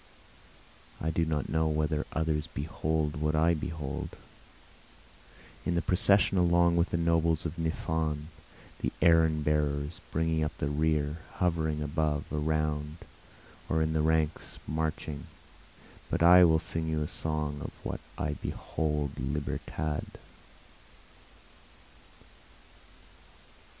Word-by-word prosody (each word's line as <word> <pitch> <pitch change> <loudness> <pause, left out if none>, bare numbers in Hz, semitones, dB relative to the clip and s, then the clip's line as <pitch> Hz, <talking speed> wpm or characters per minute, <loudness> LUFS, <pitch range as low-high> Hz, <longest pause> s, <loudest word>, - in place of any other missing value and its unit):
I 80 - -1
do 80 +1 +1
not 75 -3 -1
know 80 0 +1
whether 75 0 0
others 80 -1 0
behold 75 0 -2
what 75 +1 0
I 80 +2 +4
behold, 75 -3 -4 1.5
In 85 - 0
the 85 - +2
procession 100 +1 +4
along 85 -1 +4
with 85 +1 +2
the - - 0
nobles 85 -1 +2
of 85 +1 -4
Niphon, 80 -1 -1 0.5
the - - -1
errand 80 -2 +4
bearers, 75 0 0
Bringing 80 0 +1
up 75 - -3
the 70 - -1
rear, 75 0 +1 0.2
hovering 80 -4 0
above, 75 0 0
around, 75 0 -1 0.7
or 80 0 +2
in 80 0 0
the 80 - +2
ranks 80 0 0
marching, 80 -1 -3 0.8
But - - 0
I 90 +1 +9
will 80 -1 +5
sing 80 0 -3
you 80 -1 0
a - - -3
song 75 -2 -3
of - - -4
what - - -3 0.2
I 75 - -1
behold 75 -1 -2
Libertad. 75 +2 -3
80 Hz, 115 wpm, -30 LUFS, 75-80 Hz, 1.5 s, I